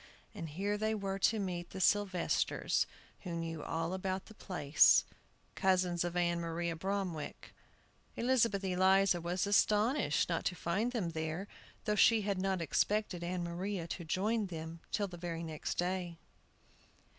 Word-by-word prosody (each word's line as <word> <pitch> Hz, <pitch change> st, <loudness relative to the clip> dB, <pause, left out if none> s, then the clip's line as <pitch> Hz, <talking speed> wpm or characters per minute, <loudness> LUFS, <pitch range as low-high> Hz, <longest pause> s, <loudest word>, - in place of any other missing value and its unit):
And 170 Hz, -7 st, -6 dB
here 200 Hz, +7 st, -2 dB
they 220 Hz, +1 st, +1 dB
were 195 Hz, -2 st, -3 dB
to 220 Hz, +3 st, +3 dB
meet 180 Hz, -4 st, -3 dB
the -, -, -7 dB
Sylvesters, 190 Hz, -2 st, +1 dB, 0.3 s
who 175 Hz, -3 st, -5 dB
knew 165 Hz, -2 st, -4 dB
all 165 Hz, +3 st, -2 dB
about 190 Hz, 0 st, -2 dB
the 220 Hz, -, -13 dB
place, 170 Hz, -8 st, +4 dB, 0.5 s
cousins 185 Hz, -3 st, +2 dB
of 175 Hz, 0 st, -3 dB
Ann 170 Hz, -1 st, +1 dB
Maria 170 Hz, 0 st, -2 dB
Bromwick. 185 Hz, -3 st, -4 dB, 0.6 s
Elizabeth 230 Hz, -5 st, +2 dB
Eliza 190 Hz, -1 st, +3 dB
was 175 Hz, +3 st, -1 dB
astonished 210 Hz, -, +3 dB
not 165 Hz, -2 st, -1 dB
to 180 Hz, -, 0 dB
find 190 Hz, +8 st, -1 dB
them 205 Hz, -9 st, -2 dB
there, 160 Hz, +4 st, -3 dB, 0.4 s
though 210 Hz, -, +1 dB
she 220 Hz, +1 st, +5 dB
had 200 Hz, -2 st, -1 dB
not 190 Hz, -2 st, 0 dB
expected 195 Hz, +2 st, 0 dB
Ann 175 Hz, 0 st, -2 dB
Maria 175 Hz, +1 st, -3 dB
to 175 Hz, -, -4 dB
join 205 Hz, +6 st, 0 dB
them 165 Hz, -1 st, -7 dB
till 205 Hz, -2 st, 0 dB
the 180 Hz, -2 st, -9 dB
very 170 Hz, -1 st, -4 dB
next 160 Hz, -2 st, -4 dB
day. 175 Hz, -1 st, -1 dB
185 Hz, 150 wpm, -34 LUFS, 170-200 Hz, 0.6 s, she